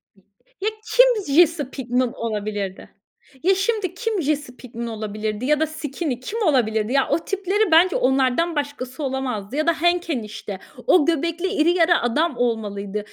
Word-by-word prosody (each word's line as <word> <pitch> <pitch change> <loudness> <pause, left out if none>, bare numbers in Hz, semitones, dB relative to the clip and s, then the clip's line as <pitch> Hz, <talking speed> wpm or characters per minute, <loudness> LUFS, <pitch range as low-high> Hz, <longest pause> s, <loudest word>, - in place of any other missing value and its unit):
İ 195 - -25 0.4
Ya, 425 - +1 0.3
kim 455 - +4
Jessie 325 -5 +4
Pinkman 250 -2 -1
olabilirdi? 210 -3 -4 0.5
Ya, 380 +2 +4
şimdi 390 -2 -1
kim 435 -1 -2
Jessie 290 -3 -2
Pinkman 235 -2 -7
olabilirdi? 215 +1 -4
Ya 300 +1 +2
da 315 - +1
Skinny 295 -3 -4
kim 445 - -5
olabilirdi? 230 - +1
Ya 275 -1 +3
o - - +2
tipleri 395 +1 -1
bence 350 +3 +5
onlardan 265 +6 +2
başkası 285 -1 -4
olamazdı 260 -4 -3
ya 310 +2 0
da 330 -1 +1
Hank 345 0 +2
enişte 215 -6 -4 0.3
o 325 -6 +5
göbekli 335 +2 0
iri 345 -4 +2
yarı 340 0 +4
adam 255 +5 0
olmalıydı 210 -4 -2
285 Hz, 155 wpm, -22 LUFS, 235-340 Hz, 0.5 s, bence